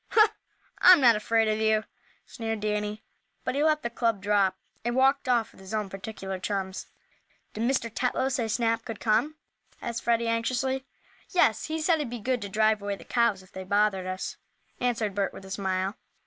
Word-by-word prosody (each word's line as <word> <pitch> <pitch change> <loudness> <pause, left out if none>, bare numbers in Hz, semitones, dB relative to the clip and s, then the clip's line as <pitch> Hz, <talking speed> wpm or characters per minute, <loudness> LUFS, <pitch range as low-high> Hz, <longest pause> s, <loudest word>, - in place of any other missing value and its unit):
"Huh! 435 -1 +6 0.5
I'm 365 -2 +9
not 240 -4 +6
afraid 225 +1 +2
of 215 0 +1
you," 220 0 +2 0.4
sneered 225 -2 -4
Danny, 210 0 -2 0.4
but - - -1
he 285 +2 +1
let 310 -1 +2
the 235 - -1
club 230 -3 0
drop, 195 -1 +2 0.3
and 240 +1 -1
walked 265 0 +3
off 235 -3 +2
with - - -17
his 190 +3 -5
own 210 -2 -2
particular 195 -1 -6
chums. 190 0 -3 0.7
"Did 230 +3 0
Mr. 245 -4 0
Tetlow 255 +2 0
say 245 -3 -1
Snap 230 0 0
could 225 -4 -7
come?" 235 +8 +1 0.4
asked 235 -1 -4
Freddie, 235 0 +1
anxiously. 255 +3 -1 0.4
"Yes. 230 - +3
He 315 +1 -3
said 320 +1 +2
he'd 290 -5 -2
be 240 - -5
good 245 +2 -1
to 200 - -5
drive 215 0 +2
away 200 0 -2
the - - -13
cows 235 -5 +1
if 185 - -21
they 190 - -7
bothered 200 -1 +1
us," 185 0 -4 0.4
answered 230 -4 0
Bert, 200 0 -1
with 195 - -10
a 190 - -11
smile. 190 0 -1
220 Hz, 190 wpm, -27 LUFS, 200-245 Hz, 0.7 s, I'm